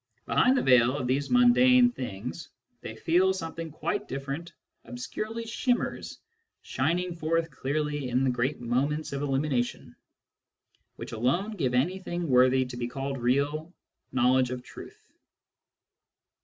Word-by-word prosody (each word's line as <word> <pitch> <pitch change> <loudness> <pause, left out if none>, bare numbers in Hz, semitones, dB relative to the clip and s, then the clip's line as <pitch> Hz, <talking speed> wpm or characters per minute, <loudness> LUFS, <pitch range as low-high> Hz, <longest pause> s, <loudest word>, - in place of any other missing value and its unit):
Behind 260 +1 +3
the - - +1
veil 125 +1 +4
of 130 - -3
these 135 +3 0
mundane 245 0 +5
things, 125 - -6 0.3
they 110 - -7
feel, 180 +9 +2
something 165 -2 -5
quite 170 +7 -3
different 140 +5 -5 0.3
obscurely 215 - -5
shimmers, 240 +2 -2 0.5
shining 180 +2 -1
forth 165 0 -1
clearly 145 0 -2
in 125 +2 +1
the 130 - +2
great 125 +4 -1
moments 140 +6 -1
of 140 - -3
illumination, 135 -3 -1 1.0
which - - -8
alone 135 - 0
give 130 -9 -1
anything 175 +4 -1
worthy 130 0 +4
to 125 -1 -8
be 120 -1 -2
called 135 +1 -4
real 145 +6 0 0.4
knowledge 130 0 +3
of 125 -1 -5
truth. - - -13
140 Hz, 130 wpm, -28 LUFS, 125-175 Hz, 1.0 s, mundane